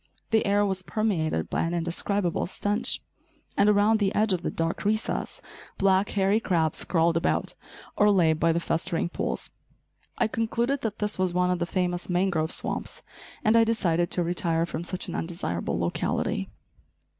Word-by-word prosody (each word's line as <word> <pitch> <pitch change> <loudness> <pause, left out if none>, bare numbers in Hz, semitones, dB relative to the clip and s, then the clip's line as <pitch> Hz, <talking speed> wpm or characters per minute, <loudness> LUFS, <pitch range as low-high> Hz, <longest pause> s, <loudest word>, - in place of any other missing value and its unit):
The 220 0 +3
air 205 +1 +3
was 190 -2 -1
permeated 180 - -1
by - - 0
an 170 +1 -1
indescribable 175 +2 -1
stench; 205 +3 0 0.5
and 205 - +4
around 210 +2 +4
the 200 -2 +1
edge 215 -1 +3
of 180 - -1
the - - -2
dark 165 0 -2
recess, 215 +2 -1 0.3
black, 195 0 +3
hairy 200 +1 +2
crabs 165 -7 0
crawled 165 -1 +2
about, 165 - 0 0.4
or 210 - +4
lay 175 -6 +4
by 165 +1 +2
the 165 - +1
festering 165 0 -1
pools. - - -2 0.7
I - - +2
concluded 235 +5 -1
that 215 -2 -3
this 210 -2 -2
was 185 -2 +1
one 180 0 +2
of 180 - 0
the 170 - -1
famous 180 -1 -1
mangrove 175 -3 +1
swamps, - - -3 0.4
and 215 +1 +4
I 230 - +7
decided 175 -7 +1
to 180 - 0
retire 165 -1 0
from 170 - -5
such 180 +1 -3
an - - -5
undesirable 165 - -3
locality. 85 0 -1
185 Hz, 165 wpm, -26 LUFS, 170-205 Hz, 0.7 s, I